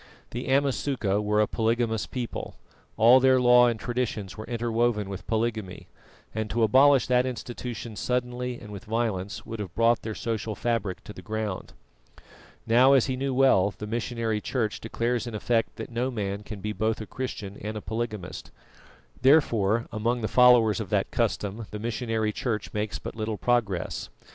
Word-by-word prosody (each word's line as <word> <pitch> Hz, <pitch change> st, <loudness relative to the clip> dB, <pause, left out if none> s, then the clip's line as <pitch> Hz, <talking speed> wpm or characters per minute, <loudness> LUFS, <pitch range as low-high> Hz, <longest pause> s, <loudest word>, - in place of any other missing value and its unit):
The 120 Hz, +2 st, -4 dB
Amasuka 135 Hz, -6 st, +1 dB
were 105 Hz, 0 st, +1 dB
a 105 Hz, -, +5 dB
polygamous 115 Hz, 0 st, 0 dB
people; 125 Hz, -3 st, -5 dB, 0.4 s
all 120 Hz, +4 st, +7 dB
their 130 Hz, 0 st, +5 dB
law 125 Hz, 0 st, +6 dB
and 115 Hz, -2 st, -1 dB
traditions 120 Hz, -6 st, -3 dB
were 110 Hz, -, -8 dB
interwoven 115 Hz, -3 st, 0 dB
with 95 Hz, -1 st, -7 dB
polygamy, 110 Hz, -4 st, -2 dB, 0.4 s
and 110 Hz, 0 st, -3 dB
to 115 Hz, +2 st, +1 dB
abolish 135 Hz, +4 st, +5 dB
that 125 Hz, 0 st, +2 dB
institution 120 Hz, -2 st, -6 dB
suddenly 125 Hz, +1 st, -2 dB
and 105 Hz, -, -11 dB
with 100 Hz, -2 st, -8 dB
violence 105 Hz, -4 st, -2 dB
would 115 Hz, -1 st, -6 dB
have 95 Hz, -5 st, -6 dB
brought 115 Hz, +1 st, +3 dB
their 110 Hz, -1 st, -5 dB
social 110 Hz, -2 st, -3 dB
fabric 115 Hz, -6 st, -2 dB
to 105 Hz, -, -9 dB
the -, -, -10 dB
ground. 110 Hz, -3 st, -4 dB, 0.9 s
Now, 125 Hz, +4 st, +6 dB
as 135 Hz, -4 st, +5 dB
he 130 Hz, -, -1 dB
knew 135 Hz, +1 st, -2 dB
well, 105 Hz, -7 st, +4 dB
the 105 Hz, -, -5 dB
missionary 115 Hz, -1 st, -2 dB
Church 110 Hz, -4 st, -2 dB
declares 120 Hz, +2 st, -1 dB
in 115 Hz, -, -5 dB
effect 115 Hz, +1 st, 0 dB
that 115 Hz, +1 st, -7 dB
no 120 Hz, +2 st, -1 dB
man 100 Hz, -4 st, -3 dB
can 105 Hz, -1 st, -8 dB
be 105 Hz, +1 st, -3 dB
both 110 Hz, +1 st, -1 dB
a 110 Hz, -, -5 dB
Christian 105 Hz, -4 st, -5 dB
and 110 Hz, +1 st, -4 dB
a -, -, -3 dB
polygamist; 110 Hz, -5 st, -5 dB, 0.7 s
therefore 115 Hz, -6 st, +4 dB
among 120 Hz, +3 st, -1 dB
the 110 Hz, -, 0 dB
followers 120 Hz, -5 st, +5 dB
of -, -, -5 dB
that -, -, 0 dB
custom 105 Hz, +2 st, -1 dB
the 105 Hz, -, -6 dB
missionary 110 Hz, -1 st, -1 dB
Church 110 Hz, -1 st, -3 dB
makes 105 Hz, 0 st, -2 dB
but -, -, -7 dB
little 110 Hz, -1 st, -3 dB
progress. 110 Hz, -8 st, -1 dB
115 Hz, 170 wpm, -27 LUFS, 105-125 Hz, 0.9 s, all